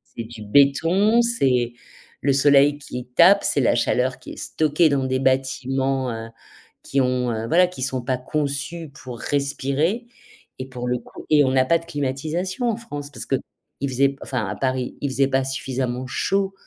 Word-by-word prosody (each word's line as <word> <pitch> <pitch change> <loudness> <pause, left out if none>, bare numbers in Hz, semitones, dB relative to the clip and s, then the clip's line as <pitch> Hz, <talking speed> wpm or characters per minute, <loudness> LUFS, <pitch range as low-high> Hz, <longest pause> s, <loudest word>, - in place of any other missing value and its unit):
c'est 115 - -4
du 110 -2 -10
béton, 165 - +4
c'est 130 - +1 0.5
le 140 -1 +2
soleil 140 +1 +5
qui 125 -3 -7
tape, 195 +4 +6
c'est 140 - +1
la 120 - +3
chaleur 130 +2 0
qui - - -10
est - - -12
stockée 155 +1 +2
dans 135 -2 +1
des 130 0 0
bâtiments, 130 0 0
heu, 115 0 -6 0.5
qui 135 - 0
ont, 125 0 +1 0.2
voilà, 180 +5 +4
qui 180 -7 -10
sont 130 -1 -1
pas 130 0 -1
conçus 150 +4 -3
pour 130 -4 -10
respirer 145 - -1 0.5
et 130 - -5
pour 125 -1 -5
le 125 0 0
coup - - -13
et 150 -1 +6
on 130 - +1
n'a 130 -1 +3
pas 165 +4 +3
de 165 - -15
climatisation 160 - -2
en 220 - 0
France 145 -11 -7
parce - - -8
qu'il 135 - 0 0.5
faisait, 135 +2 +2
enfin 125 -6 -2
à 105 - -4
Paris, 130 -1 -2
il 140 - -1
faisait 135 0 +2
pas 135 -1 +1
suffisamment 130 -2 -3
chaud 195 +8 0
135 Hz, 180 wpm, -22 LUFS, 130-155 Hz, 0.5 s, tape